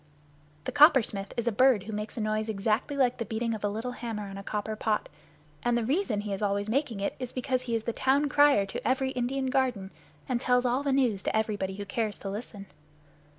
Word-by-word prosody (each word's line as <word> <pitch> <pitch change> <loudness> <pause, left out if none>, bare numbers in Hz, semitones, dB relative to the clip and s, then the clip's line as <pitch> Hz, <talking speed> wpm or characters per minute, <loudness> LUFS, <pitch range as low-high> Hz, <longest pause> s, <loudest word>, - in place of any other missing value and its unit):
The - - -3
Coppersmith 235 -10 +5
is 235 0 -1
a - - +3
bird 250 -2 +4
who 220 +2 -7
makes 210 +2 -5
a - - -1
noise 215 +1 -1
exactly 220 +7 0
like 250 -3 +2
the - - 0
beating 230 +2 -2
of 215 - -6
a 205 - +1
little 225 +5 -4
hammer 230 -4 -5
on - - -8
a 195 - -6
copper 210 +2 -3
pot; 215 0 -1 0.5
and 240 0 +1
the 235 - -1
reason 260 - 0
he 205 -1 -4
is 195 - -4
always 200 0 0
making 240 -2 -1
it 200 - -1
is 255 -2 -5
because 255 0 -1
he 240 -2 -2
is 225 - -1
the 235 - -2
town 275 +4 +2
crier 290 -7 +5
to 195 - -5
every 265 +1 +1
Indian 260 +1 -1
garden, 250 -8 0 0.4
and 245 -2 -1
tells 250 -1 +2
all 250 +2 +1
the 285 -1 0
news 250 -7 +2
to 220 - 0
everybody 205 -3 -1
who 200 0 -6
cares 215 +1 -2
to 195 - -5
listen. 205 -1 -7
230 Hz, 230 wpm, -28 LUFS, 210-255 Hz, 0.5 s, Coppersmith